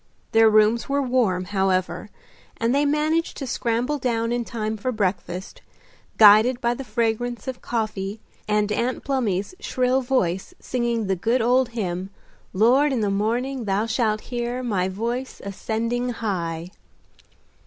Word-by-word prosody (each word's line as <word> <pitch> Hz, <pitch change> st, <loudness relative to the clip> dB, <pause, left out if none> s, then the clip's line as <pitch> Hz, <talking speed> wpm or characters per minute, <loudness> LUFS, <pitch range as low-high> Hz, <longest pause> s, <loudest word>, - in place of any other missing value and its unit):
Their 225 Hz, 0 st, +6 dB
rooms 215 Hz, +3 st, +3 dB
were 280 Hz, +1 st, +1 dB
warm, 230 Hz, -8 st, +1 dB
however, 190 Hz, +1 st, -1 dB, 0.5 s
and 230 Hz, +2 st, +1 dB
they 285 Hz, +1 st, +3 dB
managed 310 Hz, +3 st, 0 dB
to 275 Hz, -, -4 dB
scramble 245 Hz, +4 st, -1 dB
down 230 Hz, -2 st, 0 dB
in 240 Hz, 0 st, 0 dB
time 220 Hz, -2 st, -3 dB
for 235 Hz, +4 st, -2 dB
breakfast, 190 Hz, -4 st, -3 dB, 0.6 s
guided 220 Hz, +4 st, +7 dB
by 235 Hz, -1 st, +1 dB
the 270 Hz, -, -6 dB
fragrance 235 Hz, 0 st, -2 dB
of 260 Hz, -1 st, -5 dB
coffee 215 Hz, -3 st, -3 dB, 0.3 s
and 210 Hz, 0 st, +1 dB
Aunt 240 Hz, +4 st, -1 dB
Plumy's 220 Hz, -, -1 dB
shrill 255 Hz, +1 st, +1 dB
voice 195 Hz, -9 st, -1 dB
singing 235 Hz, -3 st, -1 dB
the 190 Hz, 0 st, 0 dB
good 230 Hz, +8 st, +1 dB
old 250 Hz, +1 st, +3 dB
hymn 185 Hz, -2 st, -2 dB, 0.4 s
"Lord, 250 Hz, +9 st, +4 dB
in 250 Hz, -4 st, 0 dB
the 205 Hz, -1 st, +1 dB
morning 235 Hz, +5 st, -1 dB
Thou 200 Hz, +2 st, +1 dB
shalt 220 Hz, -2 st, 0 dB
hear 245 Hz, +1 st, -3 dB
My 190 Hz, -6 st, 0 dB
voice 235 Hz, +7 st, -4 dB
ascending 230 Hz, +5 st, -2 dB
high." 180 Hz, -7 st, -3 dB
230 Hz, 145 wpm, -23 LUFS, 205-250 Hz, 0.6 s, guided